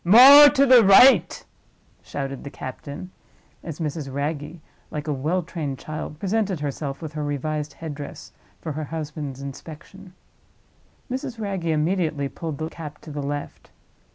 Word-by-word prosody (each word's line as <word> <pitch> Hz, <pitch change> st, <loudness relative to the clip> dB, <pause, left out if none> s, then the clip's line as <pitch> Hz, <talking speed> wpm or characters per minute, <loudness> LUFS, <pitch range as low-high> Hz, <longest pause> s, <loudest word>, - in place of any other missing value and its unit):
More 270 Hz, +10 st, +10 dB
to 280 Hz, -1 st, +3 dB
the 255 Hz, -3 st, +7 dB
right!" 195 Hz, -2 st, +6 dB, 0.6 s
shouted 135 Hz, -1 st, -6 dB
the 140 Hz, -, -7 dB
captain, 140 Hz, +6 st, -8 dB, 0.5 s
as 165 Hz, -2 st, -7 dB
Mrs. 150 Hz, -3 st, -4 dB
Wragge, 145 Hz, +3 st, -4 dB, 0.3 s
like 150 Hz, 0 st, -6 dB
a 150 Hz, -, 0 dB
well 160 Hz, +7 st, -1 dB
trained 155 Hz, -5 st, -5 dB
child, 155 Hz, +1 st, -7 dB
presented 195 Hz, -1 st, -1 dB
herself 140 Hz, 0 st, -5 dB
with 155 Hz, -1 st, -6 dB
her 155 Hz, -1 st, -4 dB
revised 150 Hz, +1 st, -3 dB
head 160 Hz, -2 st, -7 dB
dress 145 Hz, 0 st, -9 dB, 0.3 s
for 160 Hz, -, -5 dB
her 155 Hz, +1 st, -4 dB
husband's 150 Hz, -3 st, -6 dB
inspection. 165 Hz, +7 st, -10 dB, 1.0 s
Mrs. 255 Hz, -2 st, -5 dB
Wragge 195 Hz, -5 st, -3 dB
immediately 155 Hz, -2 st, 0 dB
pulled 150 Hz, +2 st, -6 dB
the 155 Hz, -, -3 dB
cap 155 Hz, -2 st, -9 dB
to 155 Hz, -, -10 dB
the 145 Hz, 0 st, -4 dB
left. 145 Hz, +1 st, -6 dB
155 Hz, 150 wpm, -23 LUFS, 145-185 Hz, 1.0 s, More